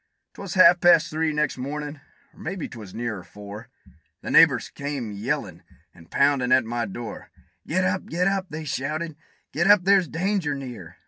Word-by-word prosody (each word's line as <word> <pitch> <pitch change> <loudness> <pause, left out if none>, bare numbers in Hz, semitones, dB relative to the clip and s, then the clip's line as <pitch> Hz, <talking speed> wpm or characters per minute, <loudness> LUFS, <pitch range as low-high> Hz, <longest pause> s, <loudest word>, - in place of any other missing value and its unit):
'Twas 200 -1 -7
half 180 -1 +7
past 170 -2 +5
three 160 0 0
next 150 -3 -1
mornin', 145 +2 -5 0.3
or - - -21
maybe 180 0 -4
'twas 110 -6 -10
nearer 115 -3 -4
four 105 +3 -11 0.5
The - - -5
neighbors - - +5
they - - -11
came 140 -6 -3
a - - -7
yellin' 100 - -3 0.3
and 80 0 -18
poundin' 140 -3 +2
at 130 -2 +5
my 120 0 -2
door; 110 +2 -8 0.4
"Get 185 +4 +1
up! 185 0 -1
get 180 +3 0
up!" 195 -1 0
they 155 +1 -6
shouted: 155 +3 -3 0.4
"get 170 +5 +1
up! 205 -3 +7
there's 195 -2 +4
danger 180 -3 -1
near! 120 -11 -9
145 Hz, 180 wpm, -24 LUFS, 120-175 Hz, 0.5 s, half